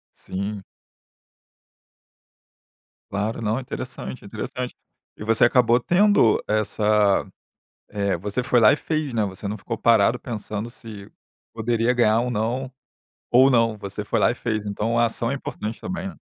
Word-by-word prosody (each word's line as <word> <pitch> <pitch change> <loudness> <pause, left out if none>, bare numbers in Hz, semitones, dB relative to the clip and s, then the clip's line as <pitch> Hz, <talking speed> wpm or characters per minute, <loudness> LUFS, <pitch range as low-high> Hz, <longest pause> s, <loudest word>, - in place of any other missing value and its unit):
Sim. 100 +1 -5 2.5
Claro, 105 +3 -2
não, 110 +1 0
é - - -3
interessante, 65 - -7
é - - -10
interessante. 125 -1 -5 0.4
E - - -7
você 115 +1 +4
acabou 120 -1 +4
tendo 180 - +3
essa 105 -1 +2 0.6
eh, 100 -3 -1
você 105 +7 -3
foi 125 -1 +3
lá 110 -1 +7
e - - +2
fez, 155 -4 -2
né, 110 -2 +1
você 100 +1 -5
não 105 - -3
ficou 115 +3 -5
parado 115 +1 +4
pensando 110 -2 -5
se 110 -5 -10 0.4
poderia 115 +1 +1
ganhar 115 -2 +3
um 125 - -2
"não" 120 +4 -2 0.6
ou 130 +2 +6
não, 115 -2 +2
você 100 +1 -6
foi 115 - 0
lá 95 - +4
e - - -3
fez. 110 -3 -3
Então 105 +3 -1
a 120 - +4
ação 115 0 -2
é - - -1
importante 110 -4 -6
também, 190 +1 -4
né. 195 - -8
115 Hz, 160 wpm, -23 LUFS, 105-120 Hz, 2.5 s, lá